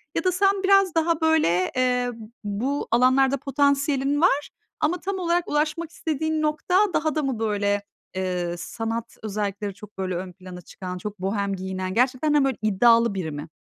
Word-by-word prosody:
Ya - - 0
da 370 - +3
sen 390 +1 +2
biraz 390 -3 +4
daha 325 0 +1
böyle, 300 - +2
eee, 250 -1 +1
b 225 -1 -10 0.2
bu 235 +8 -2
alanlarda 260 +3 +4
potansiyelin 280 +1 +1
var 295 -5 +3 0.3
ama 335 +3 +1
tam 385 0 -3
olarak 345 0 0
ulaşmak 310 +2 -1
istediğin 315 -1 -2
nokta 305 +4 0 0.2
daha 310 0 0
da 305 - 0
mı 260 -5 -2
böyle, 205 -2 0 0.3
ııı, 180 -2 -2
sanat 225 +4 -5
özellikleri 205 -1 -3
çok 210 0 -14
böyle 185 -2 -2
ön 180 0 -5
plana 185 -1 -10
çıkan, 180 +2 -7
çok 205 +1 -7
bohem 200 +1 -1
giyinen, 185 0 -4
gerçekten 255 +5 +2
de 290 -2 +4
böyle 270 -3 0
iddialı 230 +2 +4
biri 165 -5 -3
mi? 145 +2 -6
250 Hz, 170 wpm, -24 LUFS, 200-305 Hz, 0.3 s, biraz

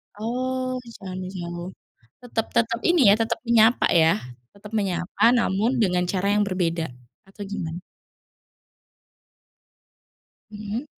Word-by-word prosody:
Oh, 255 +3 -2 0.2
jangan 185 -2 -7
menjauh, 175 -2 -6 0.6
tetep 230 -2 -2
tetep 230 0 +1
ini, 350 -2 +4
ya, - - +7
tetap 225 0 -1
menyapa, 230 0 +5
ya. 165 -1 +5 0.4
Tetap 205 +1 -12
menyapa 195 -2 -2
namun 230 +1 +1
dengan 180 -2 +1
cara 195 +2 0
yang 210 0 +3
berbeda 170 -3 -1 0.4
atau 195 +1 -9
gimana? 175 -4 -5 2.7
Mhm. 210 +5 -5
205 Hz, 110 wpm, -24 LUFS, 180-230 Hz, 2.7 s, ya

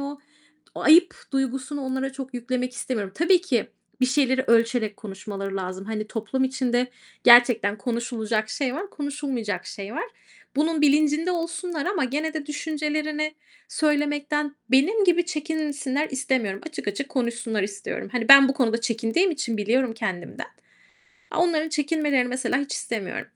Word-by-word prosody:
o 280 0 -5 0.6
o - - -6
ayıp 340 +3 +6 0.2
duygusunu 270 +2 -2
onlara 265 +1 -2
çok 265 -1 -8
yüklemek 250 +1 -2
istemiyorum. 210 -7 -3
Tabii 350 +2 +4
ki 370 - 0 0.3
bir 255 - +4
şeyleri 260 -1 +2
ölçerek 230 -2 +2
konuşmaları 195 -1 -6
lazım. 185 0 -5
Hani, 215 0 -4
toplum 230 +5 -1
içinde 255 -2 0 0.4
gerçekten 240 -4 +6
konuşulacak 225 -1 -2
şey 270 -3 -2
var, 380 +6 -5
konuşulmayacak 275 -8 -4
şey 200 +2 -7
var. - - -2 0.5
Bunun 310 +1 +1
bilincinde 300 +3 +3
olsunlar 340 -2 -3
ama 355 -7 0
gene 305 +5 -2
de 305 -2 -4
düşüncelerini 305 0 -2 0.3
söylemekten 295 -1 0
benim 375 +11 +4
gibi 350 -1 +3
çekinsinler 300 -3 -2
istemiyorum. 255 -7 -1
Açık 310 -9 -5
açık 205 +8 -3
konuşsunlar 235 -4 -2
istiyorum. 200 0 -5
Hani, 235 -2 -2
ben 275 -1 +10
bu 270 - 0
konuda 230 -3 +1
çekindiğim 230 - +1
için 275 -8 -2
biliyorum 235 +4 +1
kendimden. 190 -6 -4 0.9
Onların 325 -2 +2
çekinmelerini 295 -4 +1
mesela 255 0 0
hiç 285 0 -3
istemiyorum. 215 -5 -4
265 Hz, 140 wpm, -24 LUFS, 230-300 Hz, 0.9 s, ben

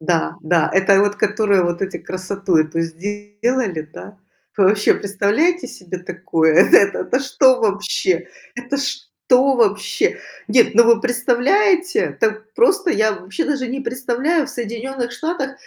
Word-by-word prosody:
Да, 165 0 -1
да, 165 +1 +1
это 195 +1 +4
вот 205 0 0
которые 205 -2 +1
вот 175 0 -2
эти 195 0 -3
красоту 185 0 -3
эту 155 +1 0
сделали, 205 +2 -3
да. 205 -1 -12 0.4
Вы 200 - +3
вообще 205 +2 +3
представляете 205 - 0
себе 185 0 -8
такое? 170 -3 -1
Это 195 +3 +5
это 255 - -1
что 260 -1 +3
вообще? 200 -4 -1 0.3
Это 240 +3 -4
что 275 -1 0
вообще? 210 -3 0 0.3
Нет, 235 -3 +3
ну, 235 +2 +6
вы 230 -1 +4
представляете? 335 - +1
Так 220 0 -2
просто 390 -6 +2
я 215 -8 +1
вообще 200 - -5
даже 275 -3 -2
не 265 +3 -4
представляю. 260 +5 -1
В - - -9
Соединенных 240 +2 -5
Штатах 310 -1 -4
215 Hz, 140 wpm, -19 LUFS, 190-260 Hz, 0.4 s, ну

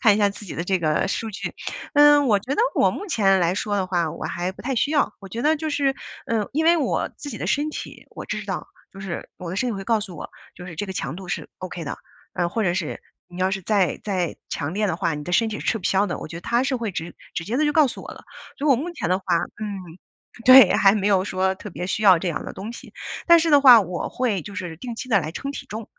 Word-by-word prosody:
看 215 -5 +6
一 - - 0
下 205 -1 +4
自 205 +1 -9
己 195 - -7
的 165 - -2
这 185 +1 0
个 155 +3 +1
数 225 +3 -2
据。 205 - -5 0.4
嗯， 290 -1 +7
我 210 -4 +4
觉 255 +8 -3
得 - - +1
我 - - +4
目 410 - -6
前 195 - +3
来 175 +1 +2
说 205 0 -1
的 190 - 0
话 175 -3 0
我 165 - -7
还 175 +2 -3
不 - - -14
太 265 +2 -2
需 265 +5 +1
要。 295 -2 +2
我 195 - -10
觉 230 - -5
得 310 +3 +3
就 310 0 -3
是， 280 -2 +1 0.3
嗯， 220 -3 0
因 315 +3 +1
为 340 +1 +6
我 305 - 0
自 290 - -7
己 220 - -7
的 - - -4
身 290 +9 0
体， - - -8
我 - - -9
知 - - -4
道。 - - -4 0.2
就 195 - -12
是 190 -3 -6
我 180 - -7
的 185 - -4
身 250 +5 0
体 - - -2
会 195 - -6
告 225 0 +2
诉 190 -4 -7
我， - - -7 0.3
就 180 - -9
是 175 - -8
这 205 - -3
个 190 - -6
强 135 -5 -4
度 185 0 -9
是 - - -4
OK 180 -3 -6
的， 140 - -4 0.4
然 175 -1 0
后 - - -16
或 230 - -1
者 175 -2 +1
是 180 -4 -3 0.3
你 175 +1 -9
要 185 - +3
是 195 -1 -3
再 200 -2 +1
再 185 -5 -1
强 150 +4 -3
烈 210 +1 0
的 165 - -1
话， 170 -3 -1
你 150 - -5
的 175 - -6
身 225 +5 +3
体 215 - -5
是 - - -8
吃 225 - +1
不 185 - -14
消 195 +2 +2
的。 - - -3
我 - - -6
觉 165 - -8
得 170 - -7
它 235 +7 +1
是 270 - 0
会 230 -4 -2
直 170 -1 -6 0.2
直 170 - -4
接 225 +8 -2
地 305 - +2
就 295 - +2
告 305 -1 +5
诉 250 - -7
我 - - -8
了。 - - -14 0.3
所 290 - -2
以 - - +3
我 275 - +7
目 300 +9 -3
前 245 - -4
的 185 - +3
话 190 - -9 0.4
嗯， 205 -2 -4 0.7
对， 255 -6 +9
还 195 - +6
没 200 -1 -1
有 195 -2 +3
说 190 -1 0
特 205 +1 -9
别 175 - -5
需 200 +3 -2
要 190 -4 +7
这 180 - -5
样 165 - -2
的 - - -6
东 210 +5 -7
西。 - - -12 0.4
但 340 0 +9
是 330 0 +1
的 290 -2 +6
话 250 -4 +9
我 180 -3 -3
会 225 -8 -1
就 200 +5 -9
是 175 -4 -5
定 235 +5 -7
期 255 - -6
地 200 -6 +4
来 155 - -4
称 275 - -5
体 - - -7
重， 220 +2 -6
200 Hz, 320 characters per minute, -23 LUFS, 180-250 Hz, 0.7 s, 对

